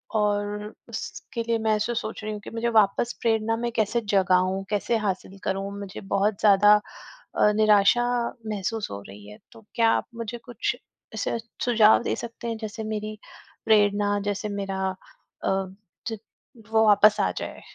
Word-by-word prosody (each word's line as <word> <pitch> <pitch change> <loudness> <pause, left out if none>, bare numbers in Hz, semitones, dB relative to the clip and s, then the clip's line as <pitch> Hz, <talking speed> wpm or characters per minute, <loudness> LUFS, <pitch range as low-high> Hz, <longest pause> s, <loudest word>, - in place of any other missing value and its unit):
और 210 0 -1 0.2
उसके 230 - -5
लिए 230 0 0
मैं 220 -1 +2
ऐसे 215 +3 -1
सोच 215 -1 -4
रही 215 - -3
हूँ 210 - -5
कि - - -9
मुझे 230 +1 -1
वापस 210 +4 +1
प्रेरणा 225 -1 +1
में 235 0 -2
कैसे 225 +2 +1
जगाऊँ? 185 0 +2
कैसे 210 +2 0
हासिल 195 -2 -3
करूँ? 195 +1 -2
मुझे 200 -2 -7
बहुत 200 0 +1
ज़्यादा 205 0 +6 0.6
अ, 210 - +4
निराशा 215 +2 +4 0.4
महसूस 215 +1 -3
हो 100 0 -6
रही 100 +1 -12
है। 105 - -11
तो 225 - -15
क्या 230 -1 +4
आप - - 0
मुझे 230 0 -5
कुछ 245 - -2 0.4
ऐसे - - -2 0.3
सुझाव 225 -2 +5
दे - - -1
सकते 235 0 -7
हैं 230 -1 -2
जैसे 220 +1 -5
मेरी 215 0 -4 0.5
प्रेरणा 205 -1 +3
जैसे 205 +1 -3
मेरा 195 -1 -3 0.6
अ, 190 0 0 0.4
ज 225 - -4 0.5
वो 220 0 +4
वापस 210 0 +6
आ - - +1
जाए? - - -6
210 Hz, 160 wpm, -25 LUFS, 200-225 Hz, 0.6 s, ज़्यादा